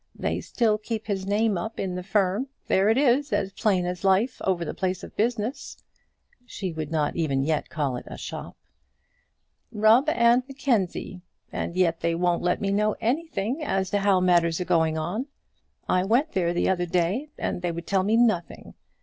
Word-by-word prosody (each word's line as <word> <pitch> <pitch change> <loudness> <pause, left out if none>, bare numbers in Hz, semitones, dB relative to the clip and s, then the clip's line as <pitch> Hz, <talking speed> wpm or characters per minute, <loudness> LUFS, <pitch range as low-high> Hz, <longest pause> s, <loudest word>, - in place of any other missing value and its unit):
They - - -2
still 220 -3 +1
keep 220 0 -4
his 195 -2 -3
name 205 -1 +1
up 220 +6 -6
in 190 -2 -2
the 180 - -4
firm. 200 +5 0 0.2
There 195 +2 +3
it 225 - +3
is 280 +1 +3
as 195 - 0
plain 190 -3 +1
as 180 +1 -4
life 195 +6 +2
over 180 -3 0
the - - -4
place 185 -1 -2
of - - -10
business" 230 +3 -2 0.7
she 195 -7 -5
would 155 -2 -4
not 155 -2 0
even 140 -5 0
yet 155 +1 -1
call 145 -6 -2
it - - -10
a - - -8
shop - - -7 1.1
"Rubb 220 +7 +4
and 235 -2 +4
Mackenzie; 230 -9 -1 0.3
and 170 - -4
yet 170 -3 +2
they 170 0 0
won't 175 0 +1
let 180 0 +1
me 200 -1 0
know 210 +1 +1
anything 270 0 -1
as 190 -9 -1
to 205 - +2
how 195 -2 +3
matters 175 -2 +3
are 180 - -2
going 160 -3 +2
on. 195 - -3 0.6
I 185 - +2
went 245 - +2
there 175 -2 +1
the 175 - 0
other 175 -2 +1
day, 180 - 0
and - - -3
they 175 -1 -1
would 170 0 -6
tell 195 -1 +1
me 210 +4 +2
nothing. 180 - 0
190 Hz, 190 wpm, -25 LUFS, 175-225 Hz, 1.1 s, Rubb